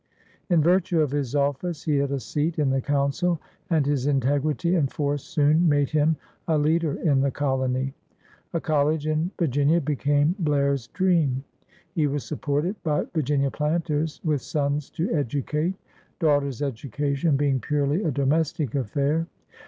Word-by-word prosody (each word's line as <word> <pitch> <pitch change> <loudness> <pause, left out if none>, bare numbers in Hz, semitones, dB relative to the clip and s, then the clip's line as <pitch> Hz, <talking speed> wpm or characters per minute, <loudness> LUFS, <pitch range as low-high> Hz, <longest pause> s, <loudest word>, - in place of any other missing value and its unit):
In 170 -4 +4
virtue 180 0 +3
of 150 -4 +2
his 145 -2 -2
office 145 +3 -1
he 150 -2 +1
had 140 0 +1
a 140 - -1
seat 150 +8 -2
in 145 -3 +2
the 135 0 +1
Council, 145 +5 0 0.3
and 160 -5 +2
his 140 -2 0
integrity 145 +5 +1
and 150 -7 +1
force 145 -1 -1
soon 155 +3 +3
made 145 -2 +2
him 155 +1 +3 0.3
a 160 -2 +2
leader 155 0 +1
in 140 -5 +3
the 140 - +2
colony. 130 -1 -1 0.6
A 170 - -1
collie 155 -1 +2
in 155 +3 0
Vir 170 - +2
ginia 145 +3 +2
became 145 +2 +1
Blair's 140 -5 +1
dream. 160 -7 +1 0.5
He 155 -3 +2
was 145 0 -2
supported 155 +6 -2
by 150 -3 0
Virginia 140 -3 +1
planters 155 0 -1
with 150 -4 0
sons 145 0 -1
to 170 +2 -2
educate 150 +5 -1 0.2
— - - -35
daugh 150 -4 +3
ters' 140 -1 -4
education 140 +3 -1
being 140 -2 +1
purely 145 +5 0
a 165 - +1
domestic 145 0 0
affair. 140 +6 0
145 Hz, 160 wpm, -25 LUFS, 140-160 Hz, 0.6 s, In